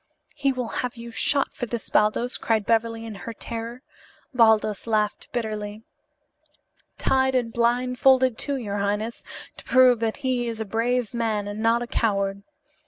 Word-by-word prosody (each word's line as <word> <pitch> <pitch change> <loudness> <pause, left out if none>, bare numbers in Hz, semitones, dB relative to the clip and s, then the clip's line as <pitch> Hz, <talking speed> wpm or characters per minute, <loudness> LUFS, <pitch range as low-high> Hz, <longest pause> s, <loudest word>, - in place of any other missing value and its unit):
"He 275 -2 +1
will 250 -3 -3
have 250 -1 -4
you 235 0 -8
shot 275 +4 +1
for 245 - -4
this, 235 -1 -5
Baldos," 215 +4 +1
cried 220 -3 0
Beverly 230 0 0
in 225 - -6
her 220 +3 -7
terror. 235 +3 -6 0.5
Baldos 220 -3 +3
laughed 215 -2 -1
bitterly. 215 -2 -4 1.1
"Tied 265 0 +2
and 235 -3 0
blindfolded, 250 +1 +3
too, 285 +4 -1
your 210 -6 -3
highness, 210 +3 -2 0.3
to - - -11
prove 255 -2 +5
that 225 -1 -1
he 250 -2 0
is 230 -1 -4
a 220 - -2
brave 230 +3 -1
man 220 -3 -1
and 205 +1 -5
not 230 +2 +2
a - - -6
coward. 200 -4 0
230 Hz, 160 wpm, -24 LUFS, 215-250 Hz, 1.1 s, prove